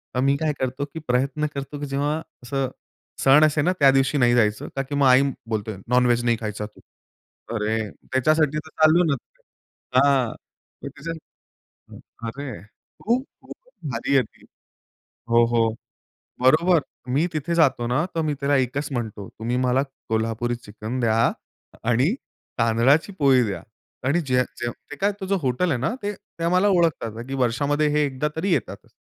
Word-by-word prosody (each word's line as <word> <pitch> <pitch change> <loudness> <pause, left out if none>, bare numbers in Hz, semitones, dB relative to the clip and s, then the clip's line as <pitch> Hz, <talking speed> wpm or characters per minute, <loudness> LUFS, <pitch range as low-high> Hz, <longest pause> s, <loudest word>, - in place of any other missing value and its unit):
तर - - +1
मी 140 - +4
काय 155 0 0
करतो 130 +2 -2
की 160 - -5
प्रयत्न 135 +4 +1
करतो 140 +1 -5
की 145 - -3
जेव्हा 140 +2 0 0.3
असं 135 +1 -1 0.5
सण 140 +3 +7
असेल 155 0 +1
ना, 180 - +4
त्या 140 -2 +7
दिवशी 135 +2 +2
नाही 120 -2 +4
जायचं 105 -3 +1
कारण 135 0 -1
की 145 - -2
मग 140 -1 +3
आई 130 +1 +7 0.3
बोलते 110 -1 -2
"नॉनव्हेज 120 -1 +3
नाही 120 -1 +2
खायचा 105 -1 -4
तू." 105 - -14 0.8
अरे, 110 0 -1 0.2
त्याच्यासाठी 150 +3 +2
तर 155 +1 -6
चाललो 155 +3 +4
ना, 155 -5 +2 0.8
हां, 135 -4 +3 0.5
त्याच्यासाठी 165 +1 -8 0.9
अरे, 130 -4 -6 0.4
खूप 240 +4 +1 0.2
खूप - - -10 0.4
भारी 120 +4 -1
आहे 135 - +5
ती, - - -22 0.8
हो, 115 0 +5
हो, 115 -1 +2 0.7
बरोबर. 160 +7 +5 0.3
मी 150 +5 +3
तिथे 155 +2 -1
जातो 130 -7 +3
ना, 135 +7 +1
तर 165 - +1
मी 155 -2 0
त्याला 140 +1 +2
एकच 130 +3 -1
म्हणतो, 110 -6 -4
"तुम्ही 120 +2 -1
मला 130 +2 +2 0.3
कोल्हापुरी 115 +2 0
चिकन 110 +2 -6
द्या 115 -2 +2 0.7
आणि 130 - +3 0.5
तांदळाची 120 - +3
पोळी 135 -3 +5
द्या." 100 -3 -4 0.4
आणि 165 +6 +2
जे 130 -4 +2 0.2
जे 120 - -1 0.2
ते - - -5
काय 200 +6 +1
तुझं 190 +1 0
हॉटेल 130 +8 +1
आहे 130 - 0
ना, 220 - 0
ते, 205 +1 -1
ते 170 -3 -11
आम्हाला 180 +4 +3
ओळखतात 150 - +1
की 135 - -5
वर्षामध्ये 140 +4 +1
हे 150 0 +2
एकदा 140 +1 -2
तरी 180 +5 -1
येतातच. - - -3
135 Hz, 165 wpm, -23 LUFS, 120-150 Hz, 0.9 s, सण